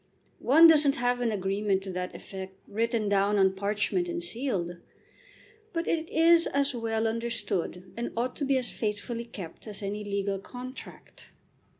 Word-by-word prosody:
One 310 +6 +7
doesn't 300 -4 +6
have 245 0 0
an 235 -2 +1
agreement 195 0 0
to 190 - -5
that 180 0 -4
effect 190 -1 -8
written 225 +1 0
down 200 +1 +2
on 190 -1 +4
parchment 210 - -1
and 345 0 -3
sealed; 215 - -3 1.0
but 335 0 -1
it 325 0 0
is 335 +1 +5
as 280 0 +1
well 225 -2 -1
understood 220 -6 -2
and 235 +1 -3
ought 245 +2 -1
to 285 - -1
be 270 0 +3
as 250 -2 -3
faithfully 230 +2 -3
kept 195 -3 -9
as 205 -1 -6
any 205 +1 -3
legal 200 -1 -2
contract. 250 +5 -10
225 Hz, 160 wpm, -28 LUFS, 200-260 Hz, 1.0 s, One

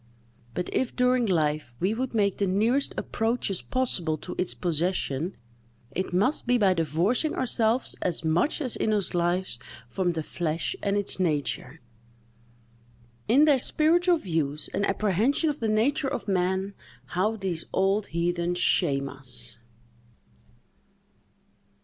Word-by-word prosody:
But 180 - -2
if, 260 - -1
during 250 -1 +2
life, 150 -8 0
we 190 +4 +1
would 245 +1 -3
make 200 -3 +2
the 200 - 0
nearest 225 +9 +1
approaches 225 -4 -1
possible 180 -12 -1
to 180 - -7
its 180 - -1
possession, 170 -1 -1 0.5
it 185 +6 -3
must 205 +11 +1
be 245 0 +4
by 195 -5 +4
divorcing 175 - +1
ourselves 240 -1 +2
as 170 -2 0
much 175 - +1
as 255 -5 +1
in 215 - 0
us 205 -4 +1
lies 175 -5 0 0.3
from 175 +6 0
the 160 -1 -3
flesh 165 0 -2
and 200 0 0
its 200 -1 +1
nature." 150 -4 -1 1.5
In 270 +7 +5
their 290 -4 +4
spiritual 340 +6 +3
views 160 - -3
and 200 +1 0
apprehension 215 - +1
of 290 - -8
the 225 - -1
nature 255 +7 +2
of - - -4
man, 190 +1 0 0.4
how 200 +5 +1
these 185 -5 -3
old 195 +2 +1
heathens 175 +1 -1
shame 140 -6 +2
us! 120 -4 -4
190 Hz, 135 wpm, -26 LUFS, 170-230 Hz, 1.5 s, In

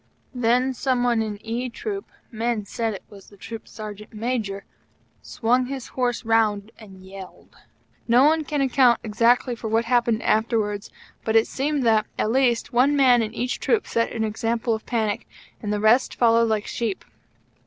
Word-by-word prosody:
Then 250 +1 +1
some 255 -1 0
one 240 -2 +2
in 215 -2 -3
E 240 +3 -3
troop 395 - -6 0.2
men 230 -2 -2
said 225 +1 -3
it - - -10
was 200 -1 -14
the 200 - -18
Troop 225 +3 -9
Sergeant 210 -1 -9
Major 215 -3 -3 0.6
swung 245 +2 0
his 270 -2 -6
horse 245 -2 -2
round 220 -2 +1
and 190 -4 -14
yelled. 190 -1 -12 0.5
No 240 +3 +5
one 310 +2 +3
can 295 -1 -2
account 260 -2 +4
exactly 235 +3 +2
for 225 - -6
what 225 +1 +1
happened 235 -2 +1
afterwards; 215 -2 0 0.3
but 220 - -1
it 225 - +5
seems 285 0 -2
that, 220 -2 +3
at 215 - 0
least, 245 -2 +1
one 265 +4 +4
man 255 -4 +5
in 220 -1 -2
each 245 +2 -2
troop 450 - +1
set 230 - -1
an 225 - -2
example 225 +2 -1
of 220 - -5
panic, 220 -4 -1 0.3
and 210 - -3
the 210 - 0
rest 220 +5 +3
followed 230 -1 +3
like 215 -2 0
sheep. 225 -5 -3
230 Hz, 175 wpm, -23 LUFS, 215-250 Hz, 0.6 s, No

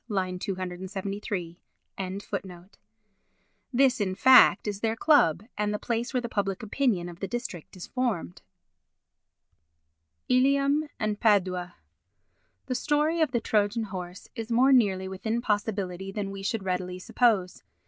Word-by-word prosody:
273.] 185 -1 -4 2.1
This, 260 -2 +3
in 185 -2 -1
fact, 255 +1 +6
is 205 -1 -3
their 225 +1 0
club 225 - +4
and 210 0 -1
the 210 - -1
place 235 +2 -2
where 255 - +1
the 235 - -4
public 200 -2 -2
opinion 215 -5 0
of 175 -1 -10
the 195 - -3
district 195 -6 -6
is 180 - -7
formed. 230 - -2 1.9
Ilium 275 +4 +3
and 210 -1 -1
Padua 185 -5 +1 0.9
The 255 - -2
story 300 +5 +1
of 315 - +3
the 245 -2 0
Trojan 215 +1 +1
horse 185 -3 -7
is 225 -2 -6
more 260 +4 +5
nearly 195 -7 +3
within 220 +5 -2
possibility 200 -4 -2
than 195 -1 -4
we 195 0 -7
should 200 +1 -2
readily 180 -1 -2
suppose. 195 -1 +1
205 Hz, 130 wpm, -27 LUFS, 185-240 Hz, 2.1 s, fact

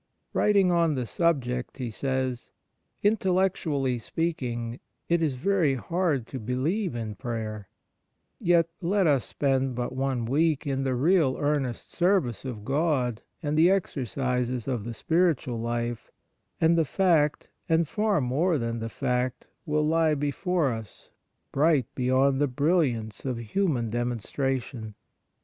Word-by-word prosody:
Writing 200 -3 +4
on 170 -3 +3
the 125 -2 -2
subject, 125 -5 -1
he 125 -4 -4
says: 130 +1 -2 0.3
' - - -45
Intel 200 -4 +3
lectually 145 -10 0
speaking, 125 -7 -3 0.3
it 170 0 +2
is 150 -5 +1
very 160 -1 +2
hard 160 -2 0
to 130 - -6
be 125 +3 -3
lieve 170 - -1
in 110 -2 -4
prayer; 110 -2 -5 0.7
yet 170 -1 +3
let 190 +2 +2
us 140 -5 +3
spend 135 -2 0
but 120 +1 -3
one 130 -3 -1
week 150 +4 +1
in 135 -1 -1
the 130 -1 0
real 150 0 +3
earnest 145 -4 -1
service 175 - +1
of 110 -5 -6
God 135 -5 0 0.2
and 150 0 -1
the 165 +3 +6
exercises 125 - -1
of 120 -6 -2
the 115 -1 -5
spiritual 160 -5 +1
life, 120 0 -3 0.5
and 165 +1 +4
the 165 - +4
fact, 160 -3 +2 0.2
and 165 0 +3
far 210 0 +1
more 150 +7 +1
than 115 -2 -2
the 115 0 -4
fact, 125 +2 -1 0.2
will 150 0 +1
lie 160 0 +3
before 145 +1 0
us, 110 -2 -10 0.4
bright 145 -3 +3
beyond 130 +2 +2
the 145 - +4
brilliance 130 - 0
of 130 -3 -2
human 120 - -1
demonstration.' 120 -1 -2
135 Hz, 140 wpm, -27 LUFS, 120-165 Hz, 0.7 s, the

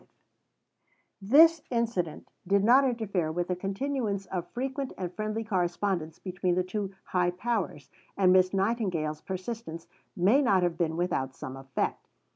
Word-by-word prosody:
V - - -27 1.2
This 325 +4 +7
incident 230 -10 -2 0.2
did 200 +1 +3
not 250 +5 +6
interfere 205 -10 -1
with 175 +2 -2
the 180 - +1
continuance 200 +1 -2
of 180 -2 -4
frequent 265 +2 -3
and 180 -2 -4
friendly 215 +2 -3
correspondence 180 -4 -1
between 180 -1 -1
the 185 - +2
two 195 +1 -4
"high 180 -1 +1
powers," 180 - -3 0.3
and 185 -2 +5
Miss 185 0 +4
Nightingale's 190 -7 -1
persistence 185 -3 -6 0.3
may 205 +11 +4
not 195 -9 +3
have 175 -1 +1
been 165 -2 -1
without 135 -7 -1
some 130 - -7
effect. 135 -1 -3
190 Hz, 145 wpm, -28 LUFS, 175-225 Hz, 1.2 s, This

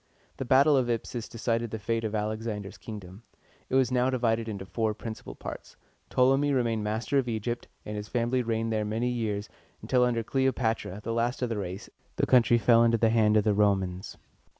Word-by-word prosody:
The 135 - -4
battle 140 +4 +5
of 130 -3 +1
Ipsus 115 0 -3
decided 115 0 -1
the 110 - -4
fate 115 +2 -2
of 110 -1 -2
Alexander's 105 -1 -3
kingdom. 100 -2 -9 0.5
It - - -1
was 130 -2 +3
now 125 0 +2
divided 115 -3 0
into 100 -3 -5
four 110 +3 -1
principal 110 0 -7
parts. - - -8 0.3
Ptolemy 135 +3 +3
remained 115 -4 0
master 110 +6 0
of 130 - -2
Egypt, 120 +2 -3 0.2
and 105 - -5
his 105 0 -5
family 120 +2 0
reigned 115 -1 -1
there 110 -1 0
many 110 +4 -1
years, 110 -4 -2 0.3
until 125 -1 +2
under 120 -2 +1
Cle 130 +4 +1
o - - +4
pa´tra, 110 -5 -2
the 115 - -2
last 120 +2 -1
of 120 - -1
his 115 - -1
race, 95 +1 -5 0.3
the - - +1
country 120 -2 +5
fell 115 +1 +5
into 115 0 +3
the 115 0 +3
hands 110 -2 +4
of 105 - +3
the 105 - +2
Romans. 95 -3 0
115 Hz, 200 wpm, -28 LUFS, 105-125 Hz, 0.5 s, battle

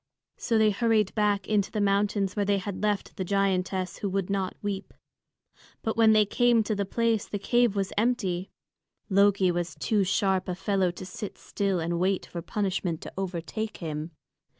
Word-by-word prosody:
So 230 - +1
they 215 -1 +4
hurried 215 -1 +2
back 205 -2 +1
into 210 -2 +1
the 215 - -3
mountains 200 -1 +1
where 205 - +1
they 200 0 +2
had 195 0 -5
left 210 -1 -1
the 190 - -1
giantess 190 -1 0
who 200 - -2
would 195 0 -1
not 195 -2 -1
weep. 200 -1 -4 0.9
But 220 - -1
when 225 -1 +6
they 215 -1 +5
came 240 +1 +3
to 215 - -1
the 200 -1 -2
place, 230 0 0
the 205 - -3
cave 240 +1 +2
was 195 -1 -1
empty. 200 -6 0 0.6
Loki 200 -1 +4
was 175 -1 -3
too 210 -3 +1
sharp 190 0 +1
a 180 - -1
fellow 190 -1 +1
to 175 +2 -7
sit 200 +2 -7
still 195 -3 -1
and 170 +1 -1
wait 190 +1 +1
for 170 - -6
punishment 185 -3 -2
to - - -8
overtake 190 +3 -4
him. 155 -1 -4
200 Hz, 180 wpm, -27 LUFS, 185-210 Hz, 0.9 s, when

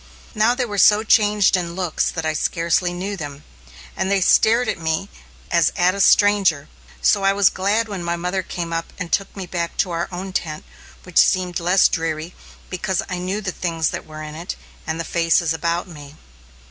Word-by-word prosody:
Now, 220 +3 +2
they 250 -1 -1
were 205 -3 -3
so 210 +2 +6
changed 210 -3 +3
in 170 -2 -3
looks 180 -4 -1
that 165 -2 -4
I 155 - 0
scarcely 170 +2 0
knew 190 +3 -4
them, 145 -4 -8 0.5
and 190 - -1
they 200 0 +2
stared 230 +6 +4
at - - -2
me 160 +4 -2 0.4
as 170 -2 +3
at 180 0 +3
a 200 - -2
stranger. 195 -9 +4 0.3
So 205 - +4
I 195 0 +4
was 200 -1 +4
glad 205 +4 0
when 195 -4 -5
my 170 0 -1
mother 180 +2 -2
came 170 -2 -5
up 165 0 -4
and 180 -3 -6
took 195 0 -1
me 190 - -5
back 170 -1 -4
to 180 - 0
our 170 0 -2
own 185 +1 -6
tent, 155 -4 -3 0.4
which 180 -2 +1
seemed 185 -2 +2
less 180 +3 +4
dreary 165 0 -3 0.3
because 190 0 -2
I 185 - -3
knew 190 +4 -3
the 190 -3 -3
things 165 -3 -1
that - - -6
were 155 0 -8
in 150 0 -8
it, 170 +4 -6 0.3
and 160 +1 -3
the - - -1
faces 165 -1 +1
about 170 +2 -2
me. 145 -4 -12
180 Hz, 200 wpm, -21 LUFS, 165-195 Hz, 0.5 s, so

